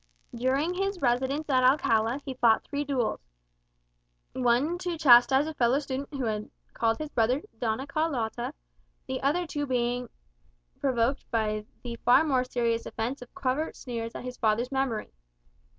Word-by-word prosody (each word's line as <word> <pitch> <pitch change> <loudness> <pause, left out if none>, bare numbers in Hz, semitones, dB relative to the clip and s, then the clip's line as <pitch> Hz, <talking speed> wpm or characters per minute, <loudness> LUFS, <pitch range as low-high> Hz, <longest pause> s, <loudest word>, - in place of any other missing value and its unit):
During 265 +8 0
his 390 +1 -2
residence 265 +3 0
at 260 -3 +3
Alcala 240 -2 +3
he 265 - -4
fought 235 -3 +3
three 285 0 -3
duels; 265 - -1 1.1
one 260 +7 +1
to 355 -2 -3
chastise 265 -1 +6
a 315 - -4
fellow 250 -2 +2
student 280 -1 -4
who 270 -2 -3
had 215 -1 -2 0.2
called 225 0 +1
his 305 -1 -6
brother 240 +4 +2 0.2
"Doña 235 +3 -1
Carlotta," 265 -4 -2 0.5
the 260 0 -4
other 310 +6 +1
two 290 -2 -4
on 290 - -2
being 245 -1 -1 0.7
provoked 260 0 0
by 215 -2 -1 0.2
the 235 -1 -5
far 245 +6 +5
more 265 -5 +2
serious 235 -2 -1
offence 235 +5 -3
of 245 - -12
covert 275 +4 -1
sneers 230 -2 -5
at - - -6
his 250 0 -6
father's 230 +3 +1
memory. 265 -5 -2
255 Hz, 155 wpm, -28 LUFS, 235-280 Hz, 1.1 s, chastise